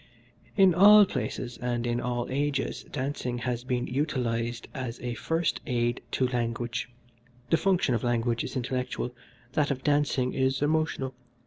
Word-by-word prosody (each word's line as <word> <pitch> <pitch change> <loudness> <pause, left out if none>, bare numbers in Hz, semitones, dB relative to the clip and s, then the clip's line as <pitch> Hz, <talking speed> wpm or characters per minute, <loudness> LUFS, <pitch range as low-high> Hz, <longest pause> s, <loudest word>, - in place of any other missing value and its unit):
"In 190 -3 +6
all 205 +4 +8
places 125 -9 -4
and 120 -1 -1
in 120 0 0
all 120 -1 -1
ages 140 0 -1
dancing 130 -2 -2
has 120 0 -2
been 125 -1 -1
utilised 120 -4 -1
as 125 -4 -5
a 125 -1 -3
first 165 +7 -1
aid 120 -2 0
to 130 - +2
language. 120 0 -2 0.6
The 165 - +5
function 180 -9 +2
of 115 - -1
language 120 -1 +1
is - - -6
intellectual, 125 -1 -2 0.4
that 145 0 +2
of 130 -2 -2
dancing 145 -3 +1
is 130 +1 +1
emotional. 150 -3 0
125 Hz, 145 wpm, -28 LUFS, 120-145 Hz, 0.6 s, all